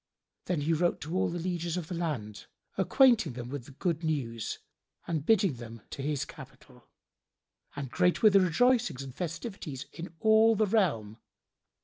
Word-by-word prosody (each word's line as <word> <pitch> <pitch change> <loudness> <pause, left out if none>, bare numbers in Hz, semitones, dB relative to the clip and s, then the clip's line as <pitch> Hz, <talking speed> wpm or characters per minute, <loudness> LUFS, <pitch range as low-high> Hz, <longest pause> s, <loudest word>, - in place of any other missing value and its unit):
Then 175 -5 -1
he 160 +3 +1
wrote 170 +2 +1
to 155 +4 -5
all 185 - +2
the 170 - -4
lieges 175 -1 -2
of 170 -3 -5
his 175 - -3
land, 120 -12 -4 0.3
acquainting 215 - +4
them 120 0 -7
with 135 -3 -6
the - - -12
good 170 +3 -2
news 125 -8 -2 0.5
and 160 -4 -2
bidding 195 - +3
them 115 -2 -10
to 140 - -6
his 145 0 -1
capital; - - -14 0.9
and 140 -3 -5
great 180 +8 +2
were 215 - +8
the 195 0 +6
rejoicings 185 - +2
and 135 -2 -9
festivities 165 - -5
in 170 -1 -8
all 220 +1 +5
the 215 +1 +3
realm. 145 - 0
165 Hz, 165 wpm, -30 LUFS, 135-190 Hz, 0.9 s, were